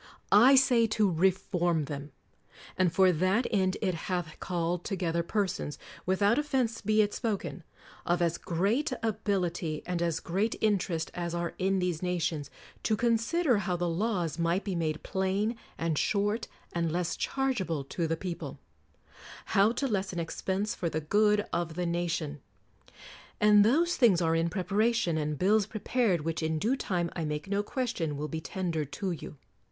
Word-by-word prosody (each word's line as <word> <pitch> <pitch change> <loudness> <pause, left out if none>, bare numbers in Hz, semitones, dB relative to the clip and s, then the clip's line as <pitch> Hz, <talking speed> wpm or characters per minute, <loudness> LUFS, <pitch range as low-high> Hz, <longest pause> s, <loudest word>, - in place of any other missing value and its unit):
I 240 +7 +8
say 245 -3 +5
to 210 -2 +4
re 180 +1 +4
form 175 -4 -1
them: 145 +1 -6 0.6
and 185 -2 +2
for 185 +1 +5
that 185 +8 +1
end 190 -4 +1
it 185 -3 +1
hath 175 -1 -4
called 175 -1 -2
to 195 - -2
gether 170 -2 0
persons 185 -5 -2
— - - -18
without 200 +7 +3
offense 260 -6 0
be 215 +1 +3
it 205 - -2
spoken 205 -6 -3 0.2
— - - -20
of 175 +1 +2
as 170 -1 0
great 205 - 0
ability 190 -7 -1
and 180 -1 -2
as 170 -2 0
great 200 +6 -1
interest 190 -6 0
as 175 -1 -3
are 170 0 -2
in 190 +1 +2
these 180 -3 -1
nations, 170 -5 -1 0.3
to 215 - +1
consider 240 +4 +2
how 180 -2 -1
the 175 0 -1
laws 175 -2 -1
might 170 +3 +1
be 195 - -3
made 160 -3 -2
plain 195 +4 0 0.2
and 165 -2 0
short 205 +2 0 0.3
and 170 -2 0
less 175 +1 -1
chargeable 210 - -1
to 165 +4 -2
the 165 0 -1
people; 170 -5 -5 1.0
how 200 +3 +5
to 275 +3 -1
lessen 195 -5 -2
expense 190 +5 -2
for 170 - -2
the 160 - -2
good 210 +5 +3
of 170 -2 -1
the 180 0 -1
nation. 170 -4 -2 1.0
And 210 -1 +6
those 325 +11 +3
things 220 -9 +5
are 165 -2 +2
in 165 +1 +1
preparation, 205 +1 +1
and 150 -1 -2
bills 205 +4 +3
prepared, 215 -4 0
which 165 +2 -2
in 160 0 0
due 225 - +1
time, 175 -9 -2
I 165 - -2
make 150 +2 -3
no 200 +1 +1
question, 205 - -2
will 150 +1 -3
be 160 0 -4
tendered 160 -6 -3
to 190 +4 -2
you. 155 -2 -7
185 Hz, 170 wpm, -29 LUFS, 165-210 Hz, 1.0 s, I